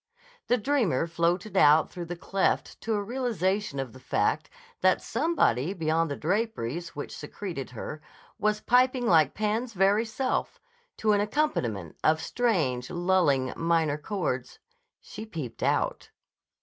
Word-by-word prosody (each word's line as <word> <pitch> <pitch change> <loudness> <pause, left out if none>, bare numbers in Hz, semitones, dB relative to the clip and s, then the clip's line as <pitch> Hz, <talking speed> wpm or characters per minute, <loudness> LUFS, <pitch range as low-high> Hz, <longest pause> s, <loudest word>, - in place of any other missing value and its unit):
The 245 - +3
dreamer 225 - +1
floated 170 +5 -1
out 155 -3 +5
through 175 -1 -6
the 175 - -4
cleft 190 +2 -1
to 225 -1 -1
a 205 - -1
realization 210 - -1
of 130 -4 -4
the 130 - -12
fact 130 - 0 0.3
that - - +4
somebody 180 - +1
beyond 165 -1 +1
the 140 - -2
draperies 170 - -2
which 145 - -6
secreted 155 -2 -6
her 150 +5 -7 0.4
was 210 0 +1
piping 250 0 +3
like 160 - +4
Pan's 220 +3 -1
very 200 +4 +3
self, 255 +4 -2 0.4
to 215 - +2
an 205 -1 +3
accompaniment 120 - -1
of 155 0 +4
strange, 160 - 0
lulling, 175 -7 +2
minor 165 -3 +1
chords. 150 - -3 0.4
She 215 - -9
peeped 155 - -7
out. - - 0
175 Hz, 135 wpm, -27 LUFS, 150-215 Hz, 0.4 s, out